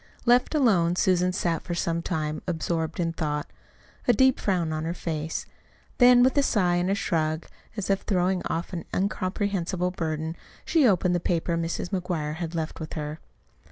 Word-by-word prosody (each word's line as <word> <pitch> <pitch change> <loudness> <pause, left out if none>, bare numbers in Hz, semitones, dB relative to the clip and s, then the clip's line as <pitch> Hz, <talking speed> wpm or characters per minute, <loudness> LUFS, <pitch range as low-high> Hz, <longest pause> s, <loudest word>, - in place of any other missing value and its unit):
Left 245 +5 +4
alone, 185 - +3
Susan 180 0 +2
sat 170 -3 -1
for 175 - -4
some 170 -1 -1
time 155 -3 -2
absorbed 165 -1 -2
in 165 -1 0
thought, 150 -3 -3 0.5
a 245 - +6
deep 260 +3 +4
frown 175 -5 0
on 155 0 -2
her 165 +2 -2
face; 160 -2 -3 0.5
then 245 -1 +7
with 260 0 +3
a - - +5
sigh 180 -9 +2
and 175 +1 0
a 195 - +2
shrug, 160 -5 -1 0.3
as 205 - -2
if 195 -1 +1
throwing 185 -1 +1
off 170 +3 -3
an 170 - -3
incomprehensible 185 -2 -1
burden, 160 -2 -3 0.3
she 310 -6 +4
opened 185 -3 +3
the 175 - +2
paper 170 0 0
Mrs. 165 +1 -2
McGuire 175 -6 -2
had 170 -1 -4
left 160 -1 -3
with 160 -1 -6
her. 150 0 -4
175 Hz, 175 wpm, -26 LUFS, 160-190 Hz, 0.5 s, then